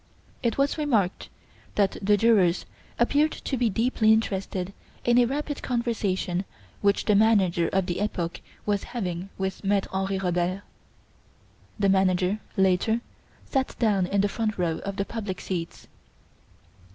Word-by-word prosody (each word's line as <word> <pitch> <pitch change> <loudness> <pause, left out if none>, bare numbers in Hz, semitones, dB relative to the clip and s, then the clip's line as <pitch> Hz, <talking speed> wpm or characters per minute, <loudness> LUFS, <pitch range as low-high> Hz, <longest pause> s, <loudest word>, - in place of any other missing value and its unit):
It 235 -3 0
was 280 +3 +1
remarked 220 -11 0 0.5
that 200 -2 +2
the 205 +1 +4
jurors 200 -6 +3 0.3
appeared 290 +6 +3
to 270 - -3
be 245 -2 +2
deeply 225 +1 +2
interested 195 -3 0 0.3
in 240 0 +5
a 245 - +5
rapid 290 +3 -3
conversation 205 -7 -1 0.4
which 200 0 +2
the 210 - +4
manager 200 -5 +4
of 190 -1 +1
the 175 0 -2
"Epoque" 175 -5 -2 0.2
was 205 -2 +1 0.2
having 180 -3 -3
with 190 +1 -3
Maitre 200 0 +1
Henri 190 0 0
Robert. 180 +1 -1 1.1
The 200 -2 +2
manager, 190 +1 +2 0.2
later, 190 +4 +2 0.4
sat 265 -2 -1
down 200 -6 +2
in 200 +1 +2
the 205 - +2
front 215 +1 -2
row 170 -3 0
of 200 0 -5
the 200 -1 -1
public 205 -5 -5
seats. 170 -3 -5
200 Hz, 140 wpm, -26 LUFS, 185-225 Hz, 1.1 s, in